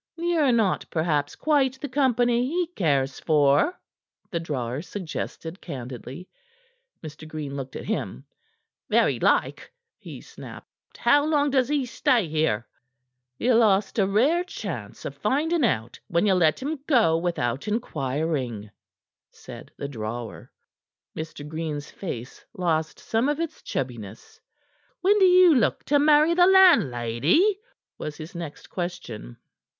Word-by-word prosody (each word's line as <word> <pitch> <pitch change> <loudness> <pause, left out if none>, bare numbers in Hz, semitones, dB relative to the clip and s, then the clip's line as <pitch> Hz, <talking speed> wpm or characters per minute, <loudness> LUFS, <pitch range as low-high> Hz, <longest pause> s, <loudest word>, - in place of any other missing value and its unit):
"Ye're 330 -5 +2
not 220 -5 +1
perhaps 155 -3 -1
quite 270 -4 +1
the 290 - -4
company 245 -3 +2
he 350 +5 0
cares 140 -6 0
for," 150 - +2 0.5
the 170 - -1
drawer 135 -5 -3
suggested 175 -1 -6
candidly. 130 +3 -8 0.8
Mr. 155 +1 -9
Green 150 -3 -6
looked 135 -1 -6
at - - -6
him. 220 - -4 0.6
"Very - - +2
like," - - +1 0.3
he - - -9
snapped. - - -14
"How 290 0 +4
long 295 -2 +1
does 260 -2 +2
he 290 -3 +1
stay 235 -4 +1
here?" 155 -8 0 0.7
"Ye 250 +1 +2
lost 215 -2 +3
a 195 - +3
rare 270 - +2
chance 160 - -7
of - - -4
finding 290 - 0
out 115 - -1
when 170 +4 +1
ye 200 - +4
let 165 -4 +3
him 300 +1 -3
go 230 - +4
without 165 - -2
inquiring," 135 - -2 0.6
said - - -12
the 140 - -4
drawer. 115 -2 -6 0.6
Mr. 155 -2 -7
Green's 155 -2 -5
face 125 - -7
lost 160 -4 -1
some 230 +5 0
of 295 +1 -1
its 335 -2 -4
chubbiness. 115 -5 -6 0.6
"When 410 +3 +4
d'ye 365 -1 +7
look 270 -7 +2
to 290 0 +3
marry 300 +2 +5
the 355 +1 +5
landlady?" 325 - +4 0.4
was 150 -1 -6
his 155 +1 -9
next 170 -4 -8
question. 120 - -6
175 Hz, 130 wpm, -25 LUFS, -, 0.8 s, d'ye